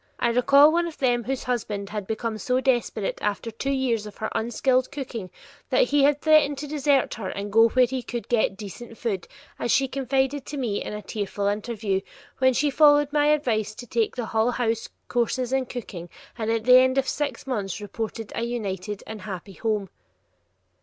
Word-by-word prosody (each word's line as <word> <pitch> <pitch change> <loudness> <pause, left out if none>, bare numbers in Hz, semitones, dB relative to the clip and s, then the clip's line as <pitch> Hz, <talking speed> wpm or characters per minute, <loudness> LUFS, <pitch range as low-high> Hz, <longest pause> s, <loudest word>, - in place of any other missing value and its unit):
I 235 - +1
recall 280 +5 +6
one 340 0 +2
of 330 - -8
them 245 -4 +1
whose 270 0 -2
husband 210 -5 -3
had 205 -2 -4
become 220 0 -3
so 250 +4 +1
desperate 240 -6 0
after 210 +2 -2
two 250 +5 -4
years 250 -6 0
of 210 - -11
her 220 - -3
unskilled 255 +3 +1
cooking 240 -9 -6 0.4
that - - +3
he 290 - +3
had 290 0 +3
threatened 310 -2 +4
to 295 +2 -5
desert 285 -2 +1
her 200 -4 -5
and 200 +1 -5
go 225 +1 +6
where 255 +2 +4
he 255 +1 -3
could 240 -1 -5
get 220 -5 +1
"decent 225 +3 -9
food," 200 -7 -3 0.3
as 235 - 0
she 270 0 +3
confided 270 +1 0
to 290 - -5
me 230 -7 -1
in - - -6
a 210 0 -6
tearful 205 -1 -3
interview, 205 -1 -1 0.4
when 260 0 +4
she 290 +2 +2
followed 290 0 +5
my 295 -1 +3
advice 225 -8 +1
to 245 - -9
take 230 -1 0
the 245 -3 -3
Hull 220 +1 +1
House 230 -2 -1 0.2
courses 245 +1 0
in 265 -1 +1
cooking, 185 -9 -7 0.3
and 220 -2 -3
at 225 -1 0
the 250 +2 +8
end 260 +1 +3
of 270 -1 +2
six 280 -5 -2
months 205 -8 -3
reported 220 +1 -5
a - - -3
united 210 -4 -4
and 220 -2 -8
happy 195 0 -7
home. 210 -1 -1
240 Hz, 195 wpm, -25 LUFS, 215-265 Hz, 0.4 s, the